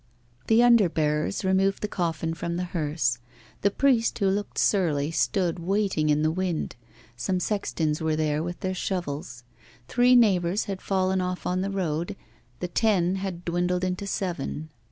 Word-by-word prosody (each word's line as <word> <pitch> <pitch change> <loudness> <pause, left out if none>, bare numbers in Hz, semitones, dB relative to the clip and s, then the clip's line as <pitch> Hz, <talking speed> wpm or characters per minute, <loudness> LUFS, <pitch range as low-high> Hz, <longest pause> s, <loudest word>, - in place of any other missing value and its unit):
The 225 +2 +5
under 235 -6 +6
bearers 155 +4 0
removed 195 +1 +2
the - - +1
coffin 165 -4 -2
from 170 +1 -4
the 180 - -2
hearse. 150 -8 -1 0.4
The 200 - +4
priest, 240 +1 +2
who 200 -3 +2
looked 205 +1 -2
surly, 155 -7 +2
stood 175 +1 0
waiting 190 -3 0
in 150 +1 +3
the 155 - +2
wind; 180 -1 -2 0.4
some 180 +10 -1
sextons 165 -7 -1
were 160 -1 +1
there 155 -1 0
with 175 +2 -5
their 185 0 -1
shovels. 145 -10 -4 0.4
Three 250 0 +4
neighbours 195 -5 +3
had 195 -2 -5
fallen 190 -1 +1
off 180 0 -3
on 180 +1 0
the 195 - -1
road, 175 -1 -2 0.5
the 180 - -1
ten 190 -1 +2
had 190 -3 -5
dwindled 180 +1 0
into 185 +2 -2
seven. 165 -5 -3
180 Hz, 160 wpm, -26 LUFS, 160-195 Hz, 0.5 s, under